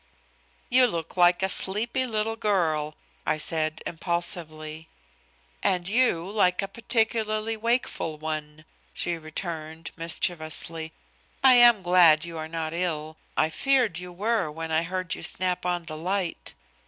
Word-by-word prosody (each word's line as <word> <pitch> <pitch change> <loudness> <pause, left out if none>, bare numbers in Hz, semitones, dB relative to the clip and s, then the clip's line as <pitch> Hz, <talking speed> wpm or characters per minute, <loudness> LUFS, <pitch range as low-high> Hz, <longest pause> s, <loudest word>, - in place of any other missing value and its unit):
"You 250 0 +6
look 165 -6 -5
like 175 0 +4
a - - +4
sleepy 230 +7 +1
little 220 -1 -1
girl," 160 -8 0 0.3
I 155 - 0
said 155 0 -2
impulsively. 160 -2 -3 0.7
"And 185 -3 +1
you 205 -6 +2
like 195 -2 +2
a - - -2
particularly 225 0 0
wakeful 230 -8 -1
one," 155 0 -6 0.3
she 175 - -1
returned, 160 0 -6
mischievously. 165 -1 -2 0.5
"I 265 -1 +8
am 240 -5 +7
glad 175 -3 +5
you 170 -1 -8
are 155 - -5
not 160 -1 -4
ill. 160 -3 -3 0.2
I 155 - +3
feared 245 - +1
you 180 0 -8
were 205 -1 -1
when 160 +1 -6
I 160 0 +2
heard 185 +1 -3
you - - -6
snap 180 -1 0
on 175 -1 -1
the 155 -2 -7
light." 185 0 -2
175 Hz, 140 wpm, -26 LUFS, 160-210 Hz, 0.7 s, I